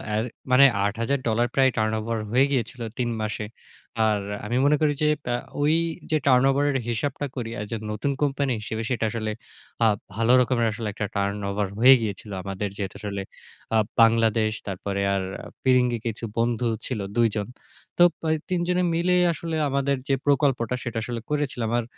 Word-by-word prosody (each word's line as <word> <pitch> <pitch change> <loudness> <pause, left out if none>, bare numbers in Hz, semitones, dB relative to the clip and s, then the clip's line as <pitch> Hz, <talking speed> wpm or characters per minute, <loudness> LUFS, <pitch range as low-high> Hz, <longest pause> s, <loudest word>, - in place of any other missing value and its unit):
এ - - +1 0.3
মানে 130 +2 +8 0.2
$৮,০০০ 115 +2 0
প্রায় 135 -1 +4
টার্নওভার 110 +1 0
হয়ে 130 +3 +5
গিয়েছিলো 120 -2 -2
৩ 120 -1 0
মাসে। 110 0 -3 0.6
আর 105 -1 +2 0.3
আমি 120 +4 -1
মনে 145 +1 +5
করি 150 -1 +3
যে, 150 - +4 0.2
প্যাঁ 120 0 -1 0.2
ওই 150 +2 +3 0.4
যে 155 - +4
টার্নওভারের 135 +2 +4
হিসাবটা 140 +5 -2
করি 120 -4 -4
এজ 105 - -6
এ - - -2
নতুন 110 +7 -1
কোম্পানি 140 -1 +1
হিসেবে 110 +1 -4
সেটা 120 -3 0
আসলে। 110 -1 -2 0.5
আ - - +6 0.3
ভালো 115 +2 +2
রকমের 120 -2 +1
আসলে 110 0 -5
একটা 105 - -3
টার্নওভার 100 0 -1
হয়ে 130 +3 +9
গিয়েছিল। 105 -1 -4
আমাদের 100 +1 -3
যেহেতু 95 -2 -4
আসলে 100 -2 -4 0.5
আ - - +5 0.2
বাংলাদেশ 115 -1 +4 0.2
তারপরে 100 +1 -3
আর 95 - -1 0.4
ফিরিঙ্গি 125 -2 +3
কিছু 115 0 -4
বন্ধু 120 +1 +1 0.2
ছিল 125 -5 -2 0.2
২ 120 -1 +4
জন। 105 -2 -2 0.5
তো 175 - +7 0.2
প্যাঁ 160 -1 +1
৩ 180 -1 +1
জনে 180 0 +2
মিলেই 180 +2 +3
আসলে 165 +1 -4
আমাদের 140 0 +1
যে, 140 - +2
প্রকল্পটা 135 -4 +2
সেটা 120 -1 -4
আসলে 120 0 -4
করেছিলাম। 145 -6 -1
আর - - -2
120 Hz, 165 wpm, -25 LUFS, 110-140 Hz, 0.6 s, হয়ে